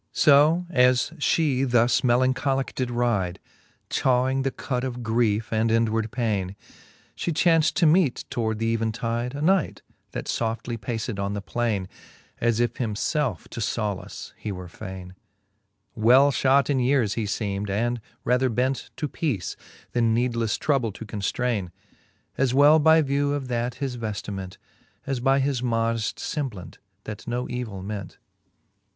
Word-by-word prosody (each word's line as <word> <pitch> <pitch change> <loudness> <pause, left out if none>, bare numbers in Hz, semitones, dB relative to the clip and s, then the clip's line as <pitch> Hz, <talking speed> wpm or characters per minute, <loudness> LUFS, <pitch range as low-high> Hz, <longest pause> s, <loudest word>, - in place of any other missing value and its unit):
So 155 +4 +5
as 125 -1 +3
(he 145 -3 +2
thus 120 -2 +3
melancholicke 130 +2 +1
did 130 -2 -2
ride, 115 -7 0 0.5
Chawing 130 +1 +2
the 135 - 0
cud 125 -1 -3
of 125 -2 -4
griefe 110 -1 +1
and 110 +1 +2
inward 115 -1 +1
paine. 105 -6 -1 0.6
She 170 - -2
chaunft 165 -1 +3
to 180 - +3
meete 160 -4 +3
toward 110 -2 -1
th'even 115 0 0
tide 115 +2 -3
A 145 - -3
knight, 190 0 +1 0.3
that - - -4
foftly 115 0 -2
paced 110 0 -3
on 100 +1 -2
the - - -2
plaine, 105 -3 -1 0.5
As 115 -1 +1
if 120 -1 +1
himfelfe 120 - -1
to - - -7
fblace 105 -3 -3
he 105 - -5
were 90 -2 -6
faine. 95 -1 -9 0.8
Well 125 +6 +5
{hot 135 +1 +3
in 135 - +2
yeares 125 -5 +2
he 110 -3 -2 0.2
{eem'd, 100 0 -3
and 120 +4 -1 0.2
rather 125 +1 +2
bent 125 +3 -1
To 150 - -2
peace, 135 - -2 0.4
then 115 -2 +2
needlefTe 115 -2 0
trouble 135 -7 +1
to 110 - -8
conftraine, 105 -1 -2 0.7
As 130 -1 +2
well 145 +3 +7
by 160 +1 +5
view 140 +1 0
of 135 -3 -3
that 120 0 -1
his 130 -1 -4
veftiment, 100 -4 -5 0.5
And 135 -3 -3
by 135 0 +4
his 135 -2 0
modeft 115 -2 0
femblant, 130 - -5 0.3
that 105 -2 -8
no 120 +1 -2
evill 115 -6 -5
ment. 100 -2 -6
120 Hz, 145 wpm, -25 LUFS, 110-135 Hz, 0.8 s, well